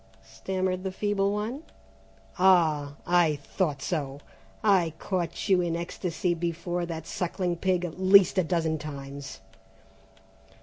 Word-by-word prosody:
stammered 185 +11 -3
the 190 - -2
feeble 200 0 0
one. 215 +7 -3 0.8
"Ah 160 -6 +4
I 175 -3 +3
thought 145 0 -2
so! 145 -5 -3 0.4
I 185 -7 +3
caught 180 0 -3
you 190 -3 +4
in 170 -1 -1
ecstasy 170 0 -2
before 170 +1 -3
that 160 -2 -5
sucking 180 0 -2
pig 180 0 0
at 175 +1 -7
least 190 0 +6
a - - +3
dozen 160 -2 0
times!" 140 -1 -8
175 Hz, 125 wpm, -27 LUFS, 155-185 Hz, 0.8 s, least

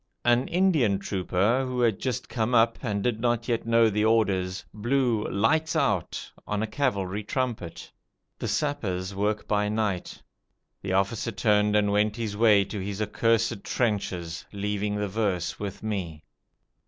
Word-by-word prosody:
An 120 +2 +3
Indian 165 - +2
trooper 100 +5 0
who 130 -1 -3
had 115 -5 +2
just 125 -2 -3
come 120 +1 0
up, 115 0 +4
and 105 -5 -2
did 120 -3 0
not 120 0 0
yet 115 -1 -1
know 115 0 +5
the 105 0 +1
orders, 95 -5 +1
blew 120 0 +1
"Lights 155 +11 +1
out", - - -1 0.2
on 105 +1 -1
a - - +1
cavalry 105 -5 -1
trumpet. 115 -7 -3 0.5
The - - -3
sappers 100 -11 -2
work 105 +2 -1
by 105 0 +1
night. 105 -4 -2 0.6
The 95 -1 -3
officer 100 +3 0
turned 105 -1 +2
and 105 -1 +3
went 105 +1 +2
his 110 -3 -3
way 105 -2 +5
to 105 - -5
his 100 +1 -4
accursed 115 0 +1
trenches, 90 -7 -2
leaving 105 0 -2
the 105 0 -1
verse 95 -4 -1
with 100 0 -6
me. 90 -8 -4
105 Hz, 155 wpm, -26 LUFS, 100-115 Hz, 0.6 s, know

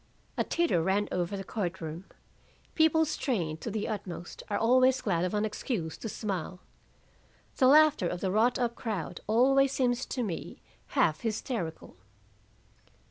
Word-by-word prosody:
A - - +1
titter 335 - +1
ran 195 +4 +1
over 180 +2 -1
the 195 - -5
court 190 -2 -3
room. 160 +3 -6 0.7
People 320 0 +4
strained 180 - -2
to - - -4
the 215 0 -2
utmost 190 -5 -6
are 205 - 0
always 255 +3 +4
glad 190 -8 0
of 185 +3 -1
an 210 +1 +1
excuse 210 - -3
to 225 - -5
smile. 185 -4 -4 1.0
The 255 - +5
laughter 300 - +6
of 175 +2 -4
a 190 - +1
wrought 225 +5 +3
up 240 -2 0
crowd 215 -9 -4
always 270 +5 +4
seems 250 -1 0
to 250 - -2
me 185 -7 -5 0.4
half 155 0 +3
hysterical. 215 -6 -4
215 Hz, 150 wpm, -29 LUFS, 180-255 Hz, 1.0 s, laughter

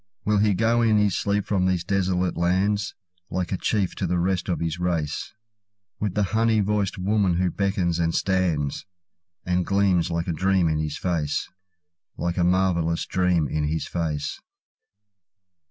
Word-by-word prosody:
Will 105 -1 +2
he 105 -1 +3
go 115 +3 +2
in 110 -2 +4
his 105 -3 +2
sleep 100 0 0
from 95 -3 +1
these 90 -2 0
desolate 95 -2 0
lands, 95 +4 0 0.3
Like 90 -1 -2
a 95 - 0
chief, 100 -2 0
to - - -1
the 90 - 0
rest 90 +1 0
of 90 - 0
his 85 0 -2
race, 85 -5 -2 0.7
With 105 -3 -2
the 105 - +2
honey 110 0 +3
voiced 100 -1 0
woman 95 -1 +1
who 90 -1 +1
beckons 95 -4 0
and 85 -1 0
stands, 90 -5 0 0.6
And 90 0 +1
gleams 95 -3 +2
like 85 +1 -2
a 85 - 0
dream 95 +1 +2
in 80 -1 0
his 75 -1 -3
face—Like 85 +1 -4
a 90 - +2
marvellous 85 -2 +1
dream 90 -4 +1
in 75 +2 -1
his 80 +2 -2
face? 75 -4 -3
90 Hz, 160 wpm, -24 LUFS, 85-100 Hz, 0.7 s, in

